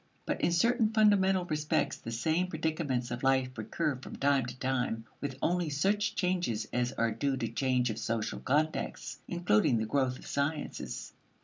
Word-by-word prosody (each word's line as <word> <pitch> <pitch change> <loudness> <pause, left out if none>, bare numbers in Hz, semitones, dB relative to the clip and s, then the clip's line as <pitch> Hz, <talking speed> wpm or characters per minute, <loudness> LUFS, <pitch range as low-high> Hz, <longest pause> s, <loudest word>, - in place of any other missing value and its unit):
But - - -2
in - - +3
certain 230 +6 +3
fundamental 200 -4 +4
respects 150 -2 0
the - - -8
same 160 +10 +1
predicaments 155 -7 -2
of 120 +1 -3
life 130 -1 +2
recur 140 +5 -2
from 130 - -9
time 140 -3 +2
to 125 - -7
time 125 -4 -1 0.2
with 140 -2 -4
only 175 -2 +1
such 205 +8 +1
changes 175 - 0
as 125 0 +1
are 115 -1 +1
due 135 +5 -1
to - - -1
change 125 -3 +1
of 110 - -5
social 110 0 -2
context, 155 +4 -1
including 130 -9 +2
the 110 - 0
growth 130 +2 +1
of - - -12
the - - -11
sciences. 145 +2 -3
140 Hz, 175 wpm, -31 LUFS, 125-175 Hz, 0.2 s, fundamental